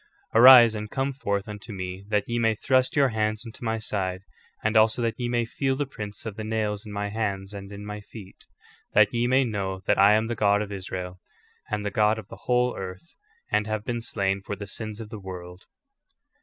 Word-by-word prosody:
* - - -37
''' - - -36
* - - -39
Arise 120 -1 +9
and 105 -1 -5
come 135 +3 -1
forth 100 -6 -2
unto 105 +1 -8
me 95 -1 -5
that 105 -2 +2
ye 120 0 -1
may 110 -1 +2
thrust 130 +3 +1
your 140 -2 +4
hands 110 0 -1
into 115 +1 -10
my 115 -1 0
side, 95 -4 -3 0.4
and 110 +1 0
also 110 +2 +4
that 115 -1 0
ye 120 -1 -1
may 120 -1 +1
feel 135 +3 -1
the 145 +2 -1
prints 105 -7 -8
of 110 -2 -6
the 110 - -4
nails 110 -1 -2
in - - -8
my 105 0 -3
hands 100 -2 -3
and 100 0 -8
in 100 0 -8
my 105 0 -6
feet; 100 -2 -13 0.5
that 105 +2 +5
ye 120 0 +1
may 130 +2 +4
know 100 -5 -3
that - - +2
I 100 +2 +7
am 110 +1 +3
the 120 - -2
God 105 -2 +3
of 105 - -8
Israel, 90 -2 -6 0.5
and 105 -1 -2
the 105 - -1
God 105 +2 +3
of 110 -1 -9
the - - -12
whole 125 0 +2
earth, 95 - -8 0.4
and 105 0 +1
have 110 0 -3
been 120 -1 -2
slain 100 -4 -1
for 100 - -5
the 100 +1 -7
sins 110 +2 -6
of 110 -2 -8
the 110 -2 -7
world. 90 -1 -9
105 Hz, 235 wpm, -26 LUFS, 100-115 Hz, 0.5 s, Arise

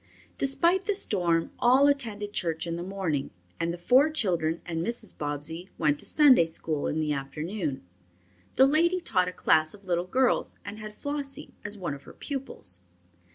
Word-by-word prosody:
Despite 340 +7 +3
the 415 - +1
storm, 175 - +2
all 255 +3 +5
attended 220 -8 -1
church 165 -3 -1
in 170 -1 -3
the 170 - -5
morning, 180 -7 -2 0.3
and 165 0 0
the 170 - -5
four 255 - +4
children 175 - 0
and 165 -1 -3
Mrs. 235 +5 -2
Bobbsey 150 +5 -3
went 150 -2 +1
to - - -3
Sunday 265 - +6
school 160 -2 -3
in 155 - -1
the 150 -1 0
afternoon. 150 +2 -4 0.7
The 265 - +7
lady 335 +6 +3
taught 185 - +1
a - - -2
class 155 -1 +2
of 200 -1 -18
little 175 0 -1
girls 255 +6 +1
and 205 +1 -7
had 215 0 -8
Flossie 285 0 -5
as 205 0 -5
one 175 -7 -3
of 140 - -9
her - - -12
pupils. 260 - -6
185 Hz, 175 wpm, -27 LUFS, 160-265 Hz, 0.7 s, The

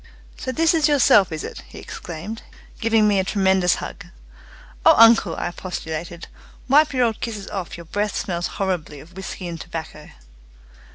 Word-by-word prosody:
"So 260 - -4
this 325 +4 +2
is 320 -2 +3
yourself, 245 - +5
is 155 -1 -4
it!" - - -7
he - - -13
exclaimed, 180 +7 -7 0.4
giving 225 -2 +3
me 205 -2 +3
a - - +2
tremendous 190 -2 +2
hug. - - -8 0.8
"Oh, - - +7
uncle," 225 -6 +6
I - - -3
expostulated, 170 -1 -6 0.4
"wipe 295 +3 +5
your 255 -3 +2
old 225 -2 -2
kisses 215 -4 -5
off! 190 -5 -5
Your 170 - -10
breath 205 +4 -2
smells 175 -2 -2
horribly 175 -7 -2
of 160 +6 -15
whisky 190 -1 -6
and 170 -2 -6
tobacco." 160 -3 -8
190 Hz, 165 wpm, -22 LUFS, 170-225 Hz, 0.8 s, Oh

